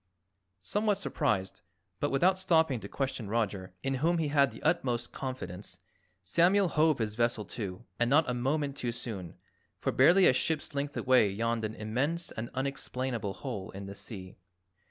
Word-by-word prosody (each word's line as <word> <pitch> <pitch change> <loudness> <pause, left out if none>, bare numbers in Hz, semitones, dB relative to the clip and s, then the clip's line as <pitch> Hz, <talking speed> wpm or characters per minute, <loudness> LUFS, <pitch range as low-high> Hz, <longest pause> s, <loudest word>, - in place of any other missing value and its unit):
Somewhat 210 -1 +1
surprised, 100 -8 -1 0.4
but 145 - +1
without 185 +7 +3
stopping 160 -8 +3
to - - -8
question 130 -6 -3
Roger, 100 -5 -2
in 135 - 0
whom 170 +2 +3
he 160 -3 0
had 140 -2 +4
the - - -12
utmost 125 -7 0
confidence, 105 -8 -6 0.5
Samuel 175 - +4
hove 155 -2 +3
his 110 -2 -1
vessel 115 -1 0
to. 95 -5 -6
And 120 0 +2
not 150 +4 +4
a 125 - 0
moment 140 +3 0
too 125 -4 -2
soon, 100 -8 -6 0.4
for - - 0
barely 175 +8 +6
a - - +6
ship's 150 +4 -1
length 140 0 -3
away 125 -5 +4
yawned 115 +3 -1
an 110 +1 -4
immense 135 +11 -1
and 115 +2 -5
unexplainable 130 -5 -2
hole 110 -8 -5
in 100 +1 -7
the 100 - -7
sea. 95 -3 -8
130 Hz, 165 wpm, -30 LUFS, 110-150 Hz, 0.5 s, barely